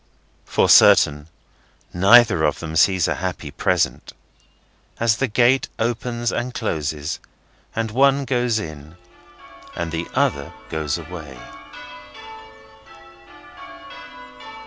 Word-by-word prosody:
For - - +1
certain, 75 +1 +5 0.7
neither 100 -1 +5
of 75 -2 +1
them 80 -1 -7
sees 95 +1 +3
a - - 0
happy 90 -5 -5
Present, - - -1 0.9
as 115 -1 +1
the 135 - 0
gate 125 +4 +2
opens 120 +1 -2
and 125 +1 -4
closes, 75 -7 -3 0.6
and 115 -1 -2
one 140 +3 +2
goes 125 -3 0
in, 80 -5 -8 0.8
and 85 -1 -4
the 85 +1 -4
other 70 +4 -1 0.2
goes 80 -2 -2
away. 80 -5 -10
90 Hz, 100 wpm, -21 LUFS, 80-120 Hz, 0.9 s, certain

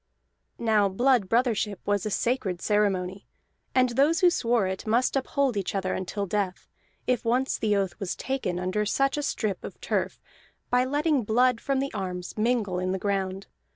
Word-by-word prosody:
Now 215 -3 +3
blood 240 0 +2
brothership 225 -4 +1
was 205 0 0
a - - -1
sacred 210 -5 -1
ceremony, 195 -2 0 0.5
and 255 -1 +4
those 285 +8 +2
who 360 -1 +6
swore 235 - +1
it 190 +3 -4
must 240 +5 +2
uphold 270 -1 0
each 200 0 -2
other 190 -1 -1
until 200 +2 -3
death, 195 -1 -2 0.4
if 250 -2 +1
once 250 +3 +1
the 210 -2 +2
oath 195 0 -1
was 195 -4 -3
taken 260 -10 -2
under 185 +4 0
such 270 +6 +1
a 295 - -1
strip 215 -9 -2
of - - -8
turf, - - -2 0.5
by 250 +1 +4
letting 290 0 +1
blood 240 +2 +2
from 275 -1 0
the 275 +1 -2
arms 180 -3 -4
mingle 215 -5 0
in 185 0 -1
the - - 0
ground. 195 -1 -2
215 Hz, 175 wpm, -27 LUFS, 195-255 Hz, 0.5 s, who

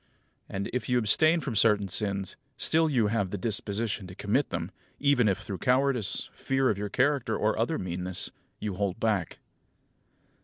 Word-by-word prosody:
And, 95 +1 -3
if 125 -2 -2
you 125 - +3
abstain 155 +9 +4
from 135 -7 -4
certain 105 -1 +4
sins, 100 0 -1 0.2
still 160 0 +2
you 125 -7 +2
have 100 -4 0
the 100 - -4
disposition 105 0 -1
to 90 - -11
commit 105 +8 0
them, - - -4 0.3
even 140 -5 +3
if 95 - +2
through 95 - -6
cowardice, 130 -3 +1
fear 135 -3 +1
for 100 - -9
your 105 0 -3
character, 130 -2 +1
or 110 +1 +1
other 120 +9 0
meanness, 90 0 -1 0.3
you 105 -2 -3
hold 100 +1 -2
back. 105 -7 0
110 Hz, 165 wpm, -28 LUFS, 100-130 Hz, 0.3 s, abstain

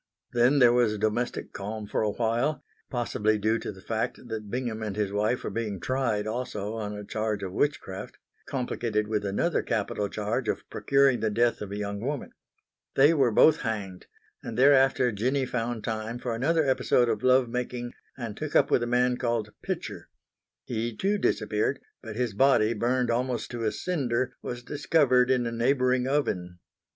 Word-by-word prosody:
Then 120 +4 +4
there 125 -3 +6
was 120 -3 +2
domestic 110 +4 -2
calm 105 +2 -5
for - - -1
a 110 - +1
while, 120 +7 0 0.3
possibly 110 -3 0
due 110 +2 +1
to - - -5
the 95 -2 -14
fact 115 +2 -3
that 110 -2 -5
Bingham 120 -2 -3
and 105 -3 -3
his 105 -2 -1
wife 105 +4 0
were - - -3
being 110 -4 -3
tried 115 -1 0
also 110 -2 -3
on 105 -2 -4
a 105 - -7
charge 110 -1 -2
of 95 - -4
witchcraft, 100 -8 -2 0.3
complicated 115 -5 -1
with 105 -1 -1
another 100 0 0
capital 105 -1 -2
charge 110 +3 -2
of - - -3
procuring 135 +3 +3
the 110 - 0
death 120 +3 +1
of 100 -2 -6
a 100 - -4
young 100 0 -3
woman. 140 +5 -4 0.6
They 145 +4 +6
were 135 -6 +3
both 150 +7 +6
hanged 100 -6 -4 0.3
and 115 - -6
thereafter 135 -2 +5
Jinny 130 +6 0
found 120 -2 -3
time 110 +1 -3
for 120 -1 -3
another 155 +7 +2
episode 130 -2 +3
of 110 -2 -1
love 130 0 +4
making 120 0 -4 0.2
and 115 -5 -5
took 155 +3 -5
up 140 - +4
with - - +4
a 120 - -1
man 125 +1 +2
called 115 -4 -1
Pitcher. - - -5 0.6
He 115 -1 -3
too 200 +2 +1
disappeared, 110 - 0 0.2
but 110 -2 -8
his 120 -2 -1
body, 115 -1 +4
burned 120 +2 +1
almost 125 0 -1
to 120 -2 -3
a 110 - +2
cinder, 130 -8 -1
was 120 0 -6
discovered 135 -3 +3
in 125 -2 +2
a 115 - -2
neighbouring 125 +1 +2
oven. 90 -11 -1
120 Hz, 180 wpm, -27 LUFS, 105-130 Hz, 0.6 s, there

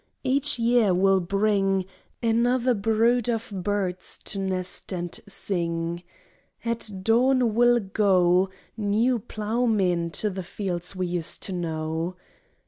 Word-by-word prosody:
Each 275 +2 +1
year 230 -5 +3
will 195 +1 +4
bring 195 0 +1 0.4
Another 240 +2 +2
brood 225 +3 +2
of 225 -2 -2
birds 190 -1 -2
to 200 - -5
nest 185 -1 -3
and 175 -2 -4
sing. 170 -3 -1 0.6
At 230 -1 -1
dawn 245 +1 +3
will 240 +1 +5
go 190 -3 +3 0.3
New 225 +4 +1
ploughmen 210 -6 0
to 210 +7 -1
the 190 0 -4
fields 180 0 -4
we 185 0 -1
used 175 -2 -3
to 190 - -4
know. 165 0 -3
200 Hz, 120 wpm, -25 LUFS, 180-230 Hz, 0.6 s, will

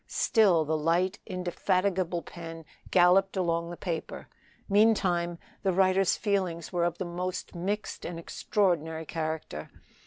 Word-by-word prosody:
Still 185 -8 +3
the 160 +1 0
light, 170 +6 +1
indefatigable 185 -1 0
pen 165 0 -9 0.2
galloped 190 +2 +4
along 170 -2 0
the 175 - -7
paper. 170 -4 -5 0.4
Meantime 190 -5 +3 0.2
the 195 - +2
writer's 190 0 +3
feelings 185 -5 -1
were 175 -1 +2
of 175 0 -1
the 185 - -3
most 180 +1 -4
mixed 200 +5 -3
and 170 - -5
extraordinary 165 -2 -1
character. 155 - -4
175 Hz, 125 wpm, -29 LUFS, 165-190 Hz, 0.4 s, galloped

